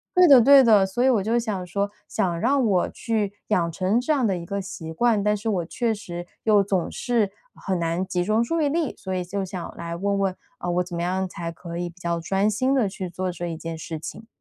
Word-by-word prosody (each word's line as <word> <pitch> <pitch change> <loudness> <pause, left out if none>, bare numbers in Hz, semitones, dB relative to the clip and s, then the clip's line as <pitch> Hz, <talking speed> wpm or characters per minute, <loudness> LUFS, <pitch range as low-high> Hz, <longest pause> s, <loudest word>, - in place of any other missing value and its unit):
对 360 -1 +7
的 270 -4 +9
对 275 +2 +8
的。 215 -4 +6
所 215 +6 -1
以 265 - +5
我 225 -6 +3
就 230 +3 +1
想 205 -6 -2
说 200 +3 -1 0.2
想 175 -5 -1
让 265 +3 +2
我 190 -4 +2
去 215 -4 -2 0.2
养 170 -5 +2
成 190 +7 +1
这 260 - -1
样 275 -5 +2
的 195 -4 +1
一 170 - -7
个 200 +2 -2
习 165 -4 -7
惯， 220 +3 +2
但 210 0 +2
是 215 - -6
我 185 -6 0
确 230 +5 -1
实 175 -4 -7 0.2
又 210 -2 +4
总 190 -3 -1
是 225 -5 0 0.2
很 190 -1 -3
难 170 +2 0
集 180 -1 -1
中 215 +4 +2
注 330 +8 -1
意 295 - +3
力， 315 0 -1
所 190 -1 -5
以 180 -1 -1
就 195 +2 -3
想 185 -2 -7
来 170 0 -5
问 200 +2 0
问， 190 -1 0 0.2
啊， 175 - -6
我 180 +1 +1
怎 175 -1 -7
么 170 - -2
样 185 +1 -1
才 170 -1 -5
可 170 0 -8
以 175 0 -2
比 175 +2 -18
较 170 0 -1
专 195 +5 +1
心 255 +6 +1
地 240 -7 +2
去 190 -1 -5
做 185 +1 -3
这 175 0 -5
一 165 - -4
件 165 0 -6
事 160 0 -6
情。 220 +7 -8
195 Hz, 270 characters per minute, -24 LUFS, 175-225 Hz, 0.2 s, 的